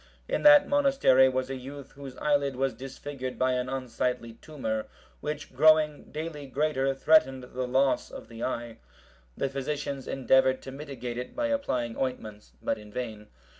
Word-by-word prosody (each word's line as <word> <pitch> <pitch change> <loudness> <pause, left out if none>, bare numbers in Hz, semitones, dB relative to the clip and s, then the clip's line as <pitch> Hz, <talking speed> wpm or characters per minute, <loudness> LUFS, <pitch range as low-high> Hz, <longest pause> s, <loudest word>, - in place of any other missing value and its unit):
In - - -1
that 295 -1 +8
monastery 275 - +5
was 130 0 -2
a - - -2
youth 135 +2 -9
whose 135 -2 -10
eyelid 140 -2 +1
was 135 0 0
disfigured 130 +1 -7
by 130 0 +2
an 125 0 -1
unsightly 125 -2 -2
tumour, 110 -5 -4 0.3
which 150 -2 -5
growing 155 +1 +4
daily 150 -2 -5
greater, 135 -1 0
threatened 135 -3 +4
the 125 0 -4
loss 135 +2 +2
of - - -10
the 115 0 -8
eye. 120 -2 -4 0.6
The - - 0
physicians 140 0 -4
endeavoured 130 0 +3
to 135 - -7
mitigate 135 -4 -6
it 125 - -7
by 295 -1 0
applying 125 - -1
ointments, 110 - -4
but - - -1
in 105 0 -13
vain. 110 -3 -5
130 Hz, 160 wpm, -28 LUFS, 125-145 Hz, 0.6 s, that